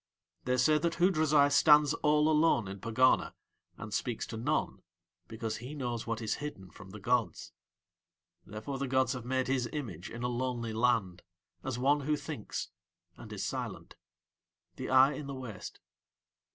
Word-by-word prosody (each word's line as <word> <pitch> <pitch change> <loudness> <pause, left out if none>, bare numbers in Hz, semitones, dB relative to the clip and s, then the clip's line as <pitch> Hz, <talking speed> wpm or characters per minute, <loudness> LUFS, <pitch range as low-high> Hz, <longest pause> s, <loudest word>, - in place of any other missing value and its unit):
They 125 0 +1
say 150 +5 +4
that 170 0 0
Hoodrazai 155 -5 +4
stands 150 0 +6
all 150 -1 +2
alone 155 -8 +3
in 100 +1 -7
Pegana 115 +5 +2 0.4
and 110 -2 -7
speaks 110 +1 -2
to - - -7
none 110 - -1 0.5
because 110 -1 -4
he 125 +6 -8
knows 120 -5 -4
what 115 0 -3
is 110 - -1
hidden 95 -11 -7
from 95 - -13
the 105 +3 -9
gods. 120 +3 -1 0.9
Therefore 110 +8 -6
the 140 - -2
gods 130 0 +2
have 125 -2 -7
made 130 +1 0
his 130 -2 0
image 110 - -5
in 120 +1 -7
a - - +1
lonely 120 -2 -2
land 110 -6 +1 0.4
as 130 -3 -3
one 140 +4 +3
who 150 +2 0
thinks 145 -8 -5 0.5
and - - -12
is - - -4
silent - - -5 0.8
the - - -5
eye 130 +2 +6
in 140 +1 -6
the 140 - -5
waste. 120 -7 -8
125 Hz, 165 wpm, -31 LUFS, 115-145 Hz, 0.9 s, stands